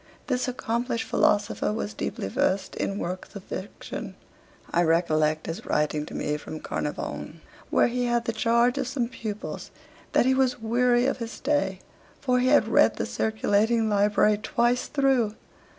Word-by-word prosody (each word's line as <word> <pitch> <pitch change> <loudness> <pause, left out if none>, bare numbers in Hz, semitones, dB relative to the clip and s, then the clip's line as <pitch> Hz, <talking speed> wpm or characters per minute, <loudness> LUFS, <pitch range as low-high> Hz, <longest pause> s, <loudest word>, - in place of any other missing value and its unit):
This 255 -2 -1
accomplished 240 -1 -2
philosopher 205 0 +2
was 210 -1 -3
deeply - - -4
versed 210 -8 0
in 195 - -2
works 185 +2 -5
of 200 - -7
fiction. 195 +1 -7 0.6
I 175 - +4
recollect 155 -2 +2
his 165 - -5
writing 150 0 0
to - - -8
me 150 0 -1
from 155 +1 -8
Caernarvon, - - -4 0.3
where - - +4
he 245 +1 0
had 240 -1 +1
the 230 - -1
charge 235 +3 +2
of 265 - -1
some 250 -2 -1
pupils, 215 -4 -6 0.4
that - - +4
he 260 - +4
was 260 -1 +1
weary 240 +2 +2
of 270 - 0
his 230 -1 -5
stay, 195 -10 -1 0.4
for 250 -2 +2
he 250 - +2
had 290 +3 +5
read - - +4
the - - -2
circulating 220 +1 +1
library 205 +1 +3
twice 240 +2 +1
through. 265 -7 +2
230 Hz, 160 wpm, -26 LUFS, 200-250 Hz, 0.6 s, had